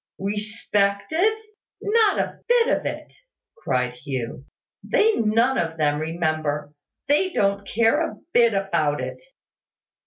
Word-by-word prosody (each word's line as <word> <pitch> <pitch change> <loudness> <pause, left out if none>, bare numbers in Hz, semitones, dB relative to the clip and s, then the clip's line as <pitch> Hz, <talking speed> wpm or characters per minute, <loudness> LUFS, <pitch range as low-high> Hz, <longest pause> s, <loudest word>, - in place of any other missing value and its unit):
"Respected?" 205 - 0 0.5
"Not 430 -1 +3
a - - -2
bit 480 -1 +4
of - - -4
it!" - - -6 0.4
cried 125 - -1
Hugh. 130 -1 -5 0.4
"They 440 +1 +2
none 230 +4 +2
of 165 -1 -2
them 150 -1 +1
remember: 155 -3 -2 0.3
they 295 +7 +3
don't 200 - 0
care 230 +9 +2
a - - -11 0.2
bit 235 -3 +4
about 170 -7 0
it." - - -5
200 Hz, 120 wpm, -23 LUFS, 155-255 Hz, 0.5 s, bit